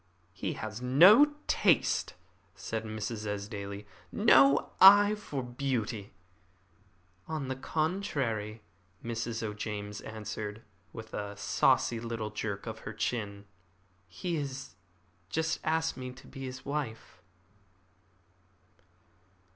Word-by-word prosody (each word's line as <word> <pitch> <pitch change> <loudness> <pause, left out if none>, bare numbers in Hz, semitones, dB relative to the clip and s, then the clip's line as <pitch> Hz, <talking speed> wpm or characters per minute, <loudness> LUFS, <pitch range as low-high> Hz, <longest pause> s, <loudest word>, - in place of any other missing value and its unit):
"He - - -3
has 110 +1 -6
no 190 - +7
taste," - - +2 0.4
said 110 0 -4
Mrs. 110 0 -4
Esdaile 100 0 -5 0.3
"no 135 +1 +5
eye 205 +2 +9
for 150 -11 -5
beauty." 120 -5 -3 1.2
"On 155 -4 -3
the 130 - -2
contrary," 130 - -2 0.4
Mrs. 115 0 -3
O'James 105 -1 -5
answered, 110 0 -6 0.3
with 110 +2 -10
a 105 0 -5
saucy 115 +3 +2
little 115 -2 -4
jerk 105 -2 -4
of 110 -1 -7
the 105 - -6
chin. 105 -3 -3 0.6
"He 165 - -3
has 135 -2 -5 0.6
just 160 +6 -1
asked 160 +1 0
me 130 -1 -6
to 130 - -15
be 135 -1 -8
his 130 0 -8
wife." 125 -10 -5
115 Hz, 105 wpm, -30 LUFS, 105-140 Hz, 1.2 s, eye